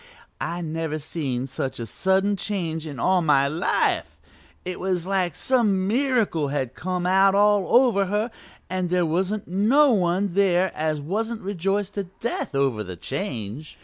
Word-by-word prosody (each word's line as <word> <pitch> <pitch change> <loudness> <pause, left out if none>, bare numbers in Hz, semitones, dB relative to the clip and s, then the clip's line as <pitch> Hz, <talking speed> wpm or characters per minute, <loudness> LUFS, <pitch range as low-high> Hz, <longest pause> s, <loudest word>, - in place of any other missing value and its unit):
I 170 +1 -3
never 160 -1 -3
seen 145 -5 -3
such 130 -1 -4
a 115 - -3
sudden 190 - +1
change 170 -6 -3
in 140 -5 -7
all 185 +7 +3
my 140 -4 +3
life; 160 +6 0 0.5
it 180 0 -4
was 180 -2 -1
like 185 -4 0
some 210 -7 +1
miracle 230 - +1
had 135 -3 -2
come 180 0 -3
out 195 +1 +4
all 205 -2 +4
over 240 -6 +4
her 210 +4 -1 0.4
and 185 -1 -2
there 180 -1 +2
wasn't 190 +6 -1
no 235 - +4
one 185 -2 +1
there 185 -1 +3
as 155 -1 -1
wasn't 220 +9 -3
rejoiced 195 +1 -2
to 200 -1 -3
death 235 -10 -3
over 135 -6 +1
the 90 -2 -7
change. 125 - -5
185 Hz, 155 wpm, -24 LUFS, 155-200 Hz, 0.5 s, out